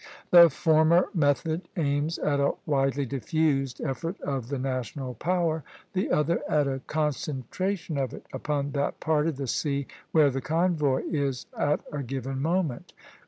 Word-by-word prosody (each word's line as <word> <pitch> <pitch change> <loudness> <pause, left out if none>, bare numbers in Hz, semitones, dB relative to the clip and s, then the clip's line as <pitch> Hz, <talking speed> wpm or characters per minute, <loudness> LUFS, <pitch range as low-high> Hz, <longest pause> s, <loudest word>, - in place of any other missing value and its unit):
The 170 -1 +10
former 160 +4 +3
method 160 +1 +1
aims 145 +1 0
at 145 -1 0
a 140 - +2
widely 135 -1 +1
diffused 135 0 0
effort 165 +7 -3
of 135 -4 -3
the 140 - -2
national 130 0 -3
power, 165 +3 0 0.3
the 190 0 0
other 150 +3 +2
at 150 -2 +2
a 135 -1 -2
concentration 155 - -2
of 130 -3 -1
it - - -10
upon 145 -1 -2
that 140 0 -1
part 155 -1 +1
of 160 -5 -2
the 140 - -3
sea 140 +2 -1 0.3
where 150 -3 +5
the 135 +1 -3
convoy 155 -1 +1
is 140 -5 -1
at 145 +1 +1
a 145 - -3
given 135 +1 -4
moment. 165 -4 -1
145 Hz, 155 wpm, -27 LUFS, 135-160 Hz, 0.3 s, The